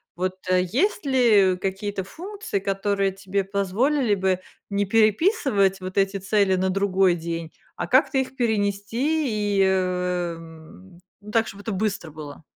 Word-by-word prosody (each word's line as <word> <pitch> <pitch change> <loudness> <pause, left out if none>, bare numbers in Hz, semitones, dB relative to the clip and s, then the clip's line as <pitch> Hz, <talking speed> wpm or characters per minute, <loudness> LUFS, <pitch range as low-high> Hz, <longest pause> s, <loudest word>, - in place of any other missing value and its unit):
Вот, 185 +1 -2
э, 185 0 +3
есть 290 - 0
ли 220 -8 +4
какие-то 195 +1 -3
функции, 385 - -5
которые 195 0 0
тебе 195 0 -2
позволили 205 +6 +1
бы 190 -1 0 0.3
не 200 0 0
переписывать 215 - +2
вот 185 +1 -7
эти 195 0 +2
цели 195 0 +2
на 190 +1 0
другой 195 -1 +2
день, 165 -1 -5 0.2
а - - -4
как-то 265 +1 +3
их 265 0 -1
перенести 220 +1 0
и, - - +5
э, 180 -2 0
м, 160 - -14 0.2
ну, 210 +1 -10
так, 225 0 +2
чтоб 200 0 -9
это 220 - -4
быстро 195 -4 -2
было? 150 0 -10
195 Hz, 150 wpm, -24 LUFS, 185-220 Hz, 0.3 s, и